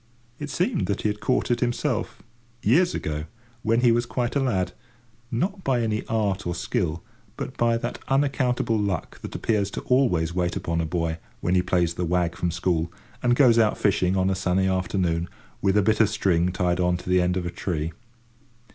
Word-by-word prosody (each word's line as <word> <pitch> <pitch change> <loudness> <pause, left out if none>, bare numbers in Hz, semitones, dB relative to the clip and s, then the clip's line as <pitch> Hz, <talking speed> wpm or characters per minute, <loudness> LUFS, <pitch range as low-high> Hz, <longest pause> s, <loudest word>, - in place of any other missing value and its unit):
It 145 - -5
seemed 170 - 0
that 100 - -2
he 105 - +2
had 105 0 -3
caught 125 +1 0
it 120 - +2
himself, 120 -1 -1 0.4
years 170 - +3
ago, 75 0 -3 0.4
when 115 +2 +2
he 120 -2 +5
was 120 +1 +1
quite 120 +2 -2
a - - +3
lad; 105 -9 0 0.6
not 190 - -2
by 130 -3 +1
any 110 -1 -1
art 105 -3 0
or 85 - -2
skill, 85 -3 -2 0.3
but 130 - -5
by 115 -1 +2
that 120 +1 -4
unaccountable 130 -5 +1
luck 100 -5 -3
that - - -7
appears 105 -3 0
to - - -5
always 100 -11 +2
wait 90 0 0
upon 85 -3 -1
a 80 - -2
boy 80 -1 -2 0.2
when 90 - 0
he 90 - +4
plays 90 -2 +1
the 90 - -3
wag 85 0 0
from 90 - -1
school, 85 -1 0 0.3
and 120 -1 +3
goes 120 -4 +5
out 110 -2 +3
fishing 95 -2 +2
on 95 +1 +2
a - - 0
sunny 95 0 +1
afternoon, 90 -2 0 0.3
with 95 +1 +2
a 105 - +4
bit 110 +3 +2
of 110 -2 +5
string 90 -4 +1
tied 90 -1 0
on 90 0 +2
to 85 - -12
the 90 0 +4
end 90 +1 +1
of 90 - -2
a 85 - -3
tree. 80 -4 -3
95 Hz, 200 wpm, -25 LUFS, 90-120 Hz, 0.6 s, he